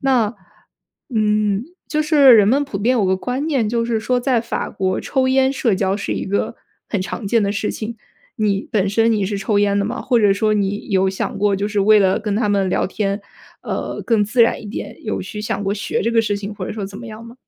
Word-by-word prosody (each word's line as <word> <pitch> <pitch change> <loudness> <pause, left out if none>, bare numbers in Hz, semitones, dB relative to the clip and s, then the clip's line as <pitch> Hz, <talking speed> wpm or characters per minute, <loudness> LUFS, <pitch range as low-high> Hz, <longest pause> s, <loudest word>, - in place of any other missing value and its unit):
那， 250 -5 +2 0.8
嗯， 210 -1 +1 0.2
就 305 - 0
是 295 -4 +6
人 205 -2 +5
们 275 +6 +3
普 245 -8 -5
遍 245 +5 +2
有 210 - +2
个 190 0 +2
观 250 +8 -3
念， 255 -8 +1
就 230 +1 0
是 230 -1 0
说 245 +3 0
在 245 -2 +1
法 230 - -4
国 190 -2 -1
抽 265 -1 0
烟 265 0 +3
社 235 -6 +1
交 190 +1 0
是 - - -3
一 - - -3
个 200 +4 -1 0.3
很 205 -4 -1
常 200 +3 -5
见 225 +2 +2
的 200 - 0
事 205 +1 -2
情。 230 +1 -5 0.4
你 200 -2 0
本 200 -2 +1
身 225 +3 +2
你 205 -3 +1
是 200 +1 -2
抽 205 +1 0
烟 200 -1 +2
的 200 - +1
吗？ 240 +5 -3
或 245 -3 +2
者 205 -2 +5
说 215 +1 +1
你 205 0 -1
有 190 -1 +2
想 190 - -4
过 200 0 +1
就 200 - -1
是 210 -1 -1
为 210 +2 +6
了 195 +2 +2
跟 210 -1 -2
他 215 -2 +1
们 195 -2 +1
聊 - - +1
天， 200 +1 -2 0.4
呃， - - -4
更 225 -3 +3
自 235 +4 0
然 230 0 +3
一 - - -9
点， 205 - -6
有 215 - -3
去 210 +3 -6
想 205 -1 -3
过 195 +1 0
学 210 - -2
这 230 +3 0
个 225 -1 +4
事 205 -2 -1
情， 200 +1 -6
或 195 -3 -5
者 - - -5
说 205 -3 -4
怎 195 0 -10
么 240 - -9
样 220 +1 -9
吗？ 230 - -12
210 Hz, 270 characters per minute, -19 LUFS, 200-230 Hz, 0.8 s, 是